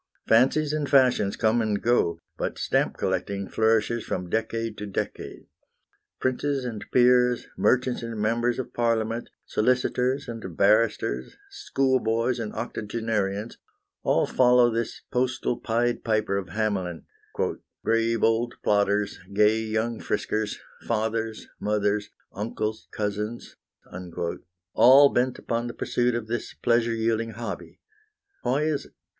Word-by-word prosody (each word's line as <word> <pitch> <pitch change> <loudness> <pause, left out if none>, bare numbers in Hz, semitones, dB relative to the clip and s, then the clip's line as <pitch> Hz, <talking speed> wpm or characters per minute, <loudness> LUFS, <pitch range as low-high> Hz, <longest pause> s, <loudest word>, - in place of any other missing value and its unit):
Fancies 140 +6 +4
and 150 -2 -1
fashions 125 -7 +4
come 110 +2 +2
and 105 -2 0
go, 115 -8 +2 0.2
but - - -3
stamp - - 0
collecting 100 -1 -2
flourishes 110 +1 +1
from 90 -1 -4
decade 115 0 -1
to 105 - -5
decade. 100 - -5 0.7
Princes 135 +1 -1
and 110 -4 -5
peers, 125 -1 +4
merchants 130 0 +2
and 115 -2 -5
members 115 +3 +1
of 130 - -5
Parliament, 115 0 0 0.2
solicitors 125 +3 +1
and 110 -8 -7
barristers, 100 - +2
schoolboys 125 -2 0
and 110 -2 -4
octogenarians, 105 -1 -3 0.4
all - - +2
follow 125 -1 +4
this 115 0 -3
postal 125 -1 0
Pied 120 +1 0
Piper 110 -3 +1
of 95 -2 -3
Hamelin, 95 -4 -2 0.8
"Grave 115 0 +1
old 115 +2 +2
plodders, 100 0 +1
gay 105 +2 +4
young 110 +1 -2
friskers, 110 -1 -2 0.2
Fathers, 110 0 -2
mothers, 105 0 0 0.2
uncles, 110 +1 -3
cousins," 105 +2 -4 1.2
all 140 +3 +8
bent 125 0 0
upon 115 +1 -2
the 120 - -7
pursuit 120 0 0
of 120 -2 -3
this 120 +2 -4
pleasure 115 -1 +1
yielding 115 0 0
hobby. 115 +2 -7 0.6
Why 135 +5 +1
is 155 -2 -1
it? - - -27
115 Hz, 120 wpm, -26 LUFS, 105-120 Hz, 1.2 s, all